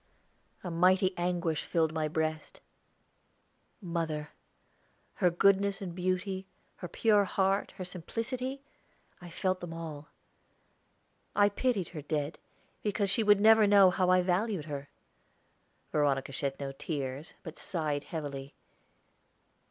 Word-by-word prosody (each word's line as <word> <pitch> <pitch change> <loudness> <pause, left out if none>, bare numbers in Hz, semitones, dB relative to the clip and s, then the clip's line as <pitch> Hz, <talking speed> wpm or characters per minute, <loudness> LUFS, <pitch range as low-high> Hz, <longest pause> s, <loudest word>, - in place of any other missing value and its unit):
A 180 - -4
mighty 185 +3 +3
anguish 175 -2 -1
filled 160 -2 +1
my 155 -1 0
breast. 155 0 -3 1.2
Mother! 160 -4 -3 0.8
her 180 - +3
goodness 195 +3 +3
and 185 -3 -5
beauty, 185 +1 -2 0.3
her 180 - -6
pure 210 +3 +3
heart, 195 0 +1
her 185 - -5
simplicity 250 +9 -4 0.6
I 175 - -9
felt 185 +2 -1
them 175 -2 -6
all. 160 -3 -7 1.3
I 205 0 +5
pitied 205 -3 0
her 155 -4 -7
dead, 150 +1 -3 0.4
because 205 -1 0
she 215 - +2
would 205 -2 +5
never 220 0 +6
know 200 -2 +7
how 180 0 +1
I 185 0 +5
valued 185 -1 0
her. 145 -2 -6 1.0
Veronica 140 -2 +1
shed 135 0 -3
no 140 -1 -4
tears, 140 0 -5
but 165 -3 -9
sighed 155 -6 -2
heavily. 140 -4 -6
175 Hz, 120 wpm, -31 LUFS, 155-195 Hz, 1.3 s, know